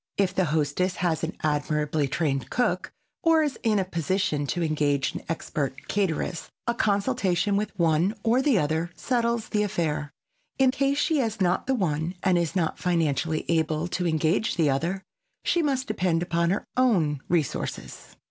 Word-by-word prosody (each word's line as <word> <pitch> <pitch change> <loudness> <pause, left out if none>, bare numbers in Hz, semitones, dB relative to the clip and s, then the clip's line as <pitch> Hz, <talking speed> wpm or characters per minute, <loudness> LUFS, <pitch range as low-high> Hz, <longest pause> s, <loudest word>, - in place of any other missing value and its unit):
If 190 -2 +2
the 185 -1 +2
hostess 155 +4 0
has 170 -3 -1
an 165 - -3
admirably 150 0 0
trained 135 -4 -1
cook 250 - 0 0.3
or 325 -1 +4
is 290 -3 -2
in 220 -2 +2
a 190 - +1
position 170 -3 -1
to 175 +4 -1
engage 145 -3 +1
an - - -5
expert 140 -4 -3
cateress, 180 -3 -1 0.2
a 235 - +1
consultation 205 -3 +1
with 210 +1 -1
one 170 +4 +2
or 235 +3 +3
the 270 -5 +3
other 160 +1 0
settles 235 -3 0
the 210 - +1
affair. 160 -8 -1 0.5
In 265 -1 +4
case 275 +1 +1
she 310 0 +2
has 225 -4 -1
not 180 +3 +1
the 265 - +2
one 170 -4 -1
and 185 -2 +3
is 170 +1 -2
not 165 -4 0
financially 160 -3 0
able 160 0 +1
to 175 0 -1
engage 160 +6 +1
the 160 -5 +3
other, 170 +8 -1 0.4
she 345 - +2
must 270 -4 0
depend 180 -5 0
upon 170 -1 +1
her 195 - -1
own 175 - +2
resources. 165 -6 -2
175 Hz, 165 wpm, -26 LUFS, 155-210 Hz, 0.5 s, or